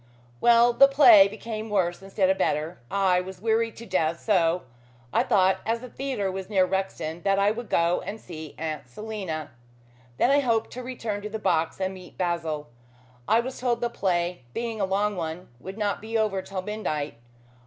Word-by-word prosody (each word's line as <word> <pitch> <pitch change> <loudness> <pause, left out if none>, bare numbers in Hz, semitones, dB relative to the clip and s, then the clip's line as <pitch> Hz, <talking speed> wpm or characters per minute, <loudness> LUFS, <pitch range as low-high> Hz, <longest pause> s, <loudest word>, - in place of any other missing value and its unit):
Well, 235 - +5
the 275 +3 +7
play 250 -8 +8
became 220 +1 -6
worse 180 -4 0
instead 195 0 0
of 190 - -1
better. 155 +4 -1
I 190 -2 +2
was 185 0 -9
weary 225 +2 +1
to 235 - -10
death, 170 -5 0
so 180 -4 +2 0.5
I - - +4
thought 190 -1 +3
as 230 +1 -1
the 250 - -8
theatre 245 -7 -2
was 190 0 -6
near 190 -3 +4
Rexton, 185 -3 -3
that 195 +2 +2
I 200 +1 +3
would 235 +1 -6
go 170 +1 +2
and 215 +2 -6
see 160 -6 -9
Aunt 155 -5 -5
Selina. 190 - -5 0.7
Then 255 - +3
I 285 - +5
hoped 230 -5 0
to 255 - -6
return 230 -5 -4
to 210 - -5
the 220 - -4
box 170 -6 0
and 190 0 -1
meet 185 -2 -13
Basil. 170 -4 -2 0.6
I 225 +2 +4
was 255 +2 -6
told 245 -2 0
the 240 0 -1
play, 175 - -1
being 230 -2 -3
a - - +3
long 200 +2 0
one, 165 0 -5
would 190 - -8
not 205 -2 -1
be 225 +1 -2
over 210 -3 0
till 190 -1 -5
midnight. 155 - -3
195 Hz, 190 wpm, -26 LUFS, 175-225 Hz, 0.7 s, play